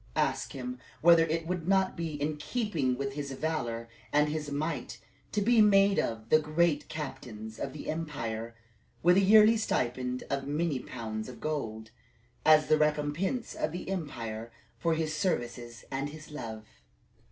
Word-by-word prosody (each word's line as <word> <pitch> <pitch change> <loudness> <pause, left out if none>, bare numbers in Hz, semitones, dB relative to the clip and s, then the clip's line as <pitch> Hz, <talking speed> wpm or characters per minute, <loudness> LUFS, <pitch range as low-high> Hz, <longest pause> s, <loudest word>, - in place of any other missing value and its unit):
Ask - - 0
him 250 0 -5 0.2
whether 170 0 +7
it 165 +1 -1
would 175 -1 -3
not 190 -1 +3
be 160 -3 -4
in 150 +1 -1
keeping 150 - -1
with 135 0 -3
his 140 -1 -4
valor 125 -6 -2 0.2
and 150 0 +3
his 150 -1 -3
might 150 +3 -3 0.3
to 210 - +1
be 230 +1 +5
made 200 -1 +5
one - - +2
of 110 0 -9
the 155 - +6
great 155 0 +1
captains 110 -8 -6
of 135 - -3
the 150 - -8
empire, 115 -8 -4 0.5
with 175 +2 +6
a - - +6
yearly 215 +3 +7
stipend 125 - -1
of 140 0 -2
many 150 -1 0
pounds 110 -2 -5
of 125 - -10
gold, 110 -8 -3 0.5
as 155 -1 +6
the 155 0 +3
recompense 150 - 0
of 155 - -2
the 175 - -6
emperor 115 - -4 0.3
for 165 -1 +2
his 155 -1 -1
services 120 -9 -2
and 135 +2 -2
his 155 0 -11
love." 110 -7 -6
150 Hz, 165 wpm, -30 LUFS, 125-170 Hz, 0.5 s, whether